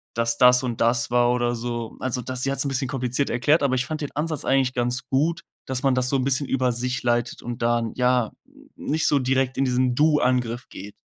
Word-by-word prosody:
dass 115 0 0
das 125 0 +6
und 120 -3 -4
das 115 0 +2
war“, 120 0 +3
oder 120 -1 0
so. 120 -1 -5
Also 125 -1 -2
das 130 +1 -5
sie 135 - 0
hat's 140 - +1
'n - - 0
bisschen 135 -1 -1
kompliziert 130 +1 -2
erklärt, 145 +6 +2
aber 130 -2 +1
ich 125 -1 0
fand 155 0 -4
den 145 - -4
Ansatz 155 0 -3
eigentlich 135 -1 +2
ganz 125 +1 -2
gut, 160 +5 0 0.2
dass 130 0 -1
man 135 -2 +2
das 125 0 +1
so 135 - +2
'n 130 - -1
bisschen 135 +1 0
über 130 -2 +1
sich 125 +2 -3
leitet 120 0 -1
und 120 0 -6
dann, 115 -1 0
ja, 125 -2 +1 0.4
nicht 160 +2 -1
so 145 - +3
direkt 130 0 0
in 135 - +2
diesen 125 -1 +1
Du-Angriff 125 -5 +1
geht. 100 +2 -9
125 Hz, 230 wpm, -23 LUFS, 120-135 Hz, 0.4 s, das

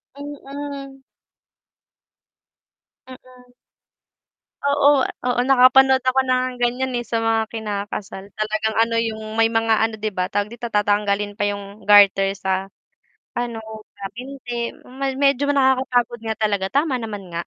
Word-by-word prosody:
Mm. 280 -1 -8 2.0
Mm. 250 -1 -16 1.1
Oo, 285 0 +4 0.4
oo. 245 -1 +1
Nakapanood 265 0 +6
ako 255 +1 +2
ng 255 0 +2
ganyan, 245 +1 -1
eh, 240 - -4
sa 225 +1 -1
mga 225 0 +2
kinakasal, 205 -2 -5
talagang 215 0 -2
ano, 230 0 +1
yung 220 -1 -3
may 225 0 +4
mga 225 0 +2
ano, 225 -1 -4
di 215 - 0
ba, 185 -2 -2
tawag 205 0 -1
dito, 235 +1 -8
tatanggalin 205 0 +1
pa 205 - 0
yung 200 0 -10
garter 195 -1 +6
sa 190 -1 -2 0.7
ano, 240 -2 -3 0.4
sa 200 - -9
binti. 245 -2 -5 0.5
Medyo 280 0 +2
nakakapagod 255 -3 +2
nga 220 -1 -3
talaga 205 -3 0
tama 280 -3 +1
naman 205 -5 -7
nga. 170 - -2
230 Hz, 125 wpm, -21 LUFS, 205-260 Hz, 2.0 s, Nakapanood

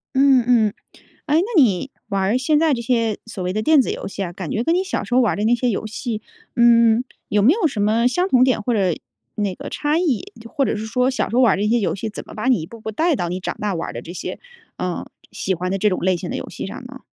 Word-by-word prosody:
嗯 265 -2 +5
嗯， 225 -4 +3 0.5
诶， 310 +2 +3
那 - - +1 0.2
你 220 0 +2 0.2
玩 195 -2 -1
儿 210 +6 +2
现 295 +3 +2
在 315 -3 +3
这 235 - -4
些 230 -2 0
所 225 -5 -6
谓 180 - -1
的 215 - -1
电 300 +2 +5
子 - - -3
游 - - -4
戏 200 0 -5
啊， 175 -2 -4
感 185 -3 -6
觉 225 - 0
跟 330 +6 +1
你 370 +1 +1
小 - - -2
时 245 - -3
候 255 - +5
玩 235 - +3
儿 - - -3
的 210 - -1
那 235 +2 +4
些 245 +1 0
游 215 - -2
戏， 220 0 -4 0.3
嗯， 235 -1 +5 0.3
有 205 -1 +2
没 255 - +6
有 400 -2 +1
什 250 -9 -2
么 225 +3 +2
相 355 +9 +1
同 255 -7 +5
点 255 -5 +1
或 245 - -1
者 190 -6 +2 0.4
那 205 -2 -1
个 - - -7
差 300 +2 0
异， 290 - -1
就 230 - -11
或 280 0 0
者 225 - -1
是 215 +1 -5
说 250 +3 +1
小 260 - -1
时 - - -6
候 255 - +4
玩 230 - +5
儿 - - -1
的 200 - -2
这 210 - +1
些 235 +1 +2
游 200 - -1
戏 220 +3 -4
怎 210 - -8
么 - - -12
把 215 +4 -4
你 245 -11 +3
一 - - -6
步 230 +5 -12
步 220 0 -5
带 325 +5 +1
到 175 - -2
你 180 +2 -3
长 - - -4
大 205 -3 -1
玩 165 - -3
儿 - - -8
的 120 - -6
这 165 +8 -9
些 - - -6 0.4
呃， 180 -1 -3 0.3
喜 190 - -1
欢 180 +2 -3
的 195 - -1
这 210 - +3
种 185 - -1
类 185 0 +2
型 175 0 -6
的 - - -3
游 - - -6
戏 - - -6
上 245 +6 -8
呢？ 265 +1 -11
225 Hz, 325 characters per minute, -21 LUFS, 200-255 Hz, 0.5 s, 没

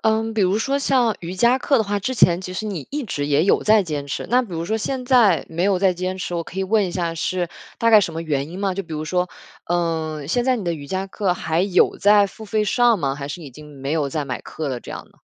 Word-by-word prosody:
嗯， 220 0 +1
比 215 - 0
如 190 +3 +2
说 275 +5 0
像 250 -6 +2
瑜 175 +2 -6
伽 240 +6 +3
课 275 -1 +2
的 220 - +1
话， 205 0 -2
之 255 +6 -2
前 175 -5 +4
其 185 -1 -7
实 215 - -3
你 180 -9 -5
一 290 -2 -3
直 145 -8 -3
也 145 +2 +2
有 195 - +3
在 215 -1 +5
坚 150 -4 -4
持。 - - -4
那 250 +1 +3
比 230 - -9
如 165 0 -3
说 220 +5 -1
现 255 +3 -3
在 245 -5 +4
没 165 +2 -3
有 195 -1 +2
再 190 -1 +3
坚 185 +1 -3
持， 175 - -4
我 170 - -1
可 185 - -9
以 190 - 0
问 205 0 +2
一 - - -5
下 170 -2 -2
是 175 +1 -2 0.3
大 230 0 +3
概 215 - +8
什 170 -4 -2
么 165 - -4
原 145 -2 -2
因 180 +3 -8
吗？ 195 -2 -1
就 195 - -3
比 165 -2 -11
如 155 0 -3
说， 180 +2 0 0.4
嗯， 160 -4 -1
现 240 +9 0
在 255 -1 +2
你 205 - -5
的 170 - 0
瑜 145 -2 -9
伽 190 +1 -2
课 190 -2 -1
还 165 -1 -1
有 190 -2 +3
在 205 0 +5
付 220 +3 -11
费 215 0 0
上 235 0 +3
吗？ 135 -3 -1
还 140 0 -6
是 170 +3 -6
已 145 - -9
经 150 +1 -13
没 140 +3 -2
有 150 -3 0
在 150 +1 -2
买 130 -2 -4
课 155 - -6
了 125 -2 -3
这 - - -11
样 - - -7
呢？ - - -27
185 Hz, 310 characters per minute, -21 LUFS, 160-215 Hz, 0.4 s, 概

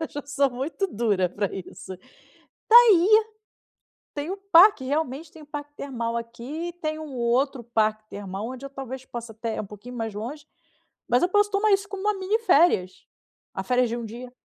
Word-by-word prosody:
Eu 320 - -3
já 290 - -6
sou 280 -1 +1
muito 275 +10 -3
dura 205 - 0
pra 200 +2 -2
isso. 190 0 -8 0.7
Tá 450 - +5
aí! 425 -7 +8 1.1
Tem 290 +3 -4
o 385 - -3
parque, 345 -5 +7
realmente 290 +2 -2
tem 320 -4 -14
o - - -14
parque 290 0 -7
termal 235 -4 -3
aqui, 245 +9 -5
tem 310 0 -2
um 305 -3 -8
outro 250 +2 0
parque 215 -2 0
termal 200 +1 -6
onde 260 +1 -7
eu 275 - -10
talvez 265 -1 -7
possa 235 -2 -7
até 225 +1 -4
um 210 - -6
pouquinho 210 +5 -11
mais 225 -3 -4
longe, 245 +9 -6 0.6
mas 245 +1 +3
eu 355 - +3
posso 410 +1 +3
tomar 415 +1 +2
isso 395 +1 +1
como 395 -1 -6
uma 420 +1 +2
mini 385 +4 0
férias, 295 - +2 0.5
a 190 - -3
férias 250 +4 +2
de 235 - -3
1 235 - -5
dia. 240 +3 -8
260 Hz, 190 wpm, -25 LUFS, 230-320 Hz, 1.1 s, aí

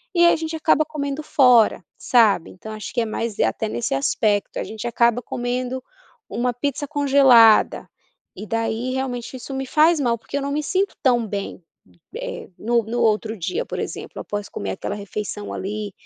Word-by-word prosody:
e 345 - +6
a 345 - +6
gente 320 0 -4
acaba 310 -1 +3
comendo 295 -1 -4
fora, 250 -10 +4
sabe? 220 -8 +3
Então 215 +4 -10
acho 215 -1 -7
que 240 - +1
é - - 0
mais, 225 0 -3
até 110 - 0
nesse 120 +4 -2
aspecto, 205 +9 0
a - - -2
gente 220 +2 -6
acaba 235 +1 +2
comendo 250 +2 -3 0.5
uma 245 +1 -1
pizza 285 +3 -3
congelada, 270 -6 +5 0.5
e - - -7
daí 225 +3 -2
realmente 260 -2 -4
isso 270 +3 -8
me 265 0 -3
faz 310 +4 +4
mal, 235 -4 +1
porque 275 +5 -6
eu - - -2
não 280 +1 -3
me 300 +1 -1
sinto 380 +5 0
tão 240 -3 +3
bem, 200 -2 -5 0.6
eh, - - -6
no 235 +1 +1
no 235 +2 -3
outro 220 -1 +1
dia 180 +1 -2
por - - -5
exemplo, - - -6
após 205 0 -5
comer 100 - -5
aquela 145 - -4
refeição 205 +1 -5
ali, 205 +1 -4
240 Hz, 180 wpm, -22 LUFS, 215-275 Hz, 0.6 s, e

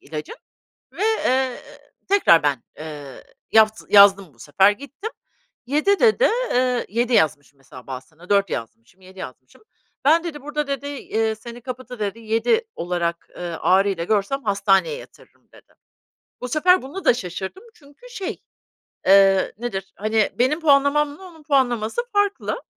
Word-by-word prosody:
ilacın 155 0 -8 0.6
ve, - - -6
eee, 265 - 0 0.5
tekrar 385 - +5
ben, 140 -5 0 0.2
eee, 150 -3 -9 0.3
yavz 220 0 +3
yazdım 195 -6 +6
bu - - -29
sefer. 150 - +3
Gittim 285 - -8 0.6
7 305 +10 +1
dedi, 470 +1 +4 0.3
ııı, 250 -1 +1
7 240 +3 -1
yazmışım 145 -5 +1
mesela 130 -2 -14
bazısına 155 +7 -10
4 200 -1 +3
yazmışım, 115 +8 -7
7 190 0 -16
yazmışım. 130 - -11 0.4
"Ben" 325 +4 +4
dedi, 295 -4 -6
"burada" 295 +1 -3
dedi, 280 0 -4
eee, 225 -6 -2
"seni 235 +2 -11
kapıda" 255 -1 -8
dedi, 205 +1 -3
"7 230 - +1
olarak, 170 -1 -3
eee, - - -8 0.2
ağrıyla 190 -2 +2
görsem 215 +8 0
hastaneye 200 - +2
yatırırım" - - -16
dedi. - - -21 0.7
Bu 250 - -4
sefer 360 +5 +3
buna 310 +9 -8
da - - +6
şaşırdım 190 - -6
çünkü 290 - -18
şey, 390 -6 -6 0.7
eee, 195 0 +5
nedir, 195 -5 -5
hani, 215 +1 +1
benim 260 +6 +2
puanlamamla 290 +2 +2
onun 325 -4 -15
puanlaması 255 - +1
farklı. 410 +4 -1
225 Hz, 140 wpm, -22 LUFS, 190-290 Hz, 0.7 s, yazdım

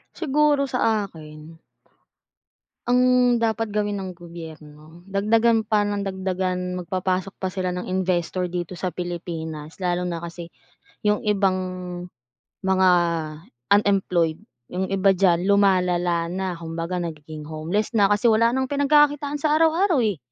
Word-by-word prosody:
Siguro 295 -2 +2
sa 255 -1 -2 0.3
akin 155 -1 -13 1.3
ang 250 0 +4
dapat 225 -1 0
gawin 205 -1 -1
ng 185 -2 -6
gobyerno 160 -1 -12
dagdagan 220 +2 +2
pa 210 -1 +2
nang 205 -1 -2
dagdagan, 185 -1 -2
magpapasok 185 +1 -2
pa 190 -1 -4
sila 185 -1 -2
ng 180 - -4
investor 185 -1 -1
dito 175 0 -5
sa 180 -2 -3
Pilipinas. 165 -3 -5
Lalo 180 0 0
na 170 -1 -4
kasi 170 0 -7 0.6
yung 210 0 +2
ibang 200 -3 +2 1.1
mga 190 -1 +4 0.8
unemployed 190 -5 +2 0.3
yung 185 +1 -2
iba 195 0 +3
diyan 180 -2 +2
lumalala 180 -4 +2
na 185 +1 -3
kumbaga 165 +2 -4
nagiging 155 -3 -6
homeless 160 +9 -2
na 205 -3 +4
kasi 210 +3 +1
wala 230 0 +5
nang 260 +2 0
pinagkakakitaan 290 +1 +2
sa 300 +1 +1
araw-araw 330 -1 +3
eh. 210 -6 0
185 Hz, 125 wpm, -23 LUFS, 175-215 Hz, 1.3 s, wala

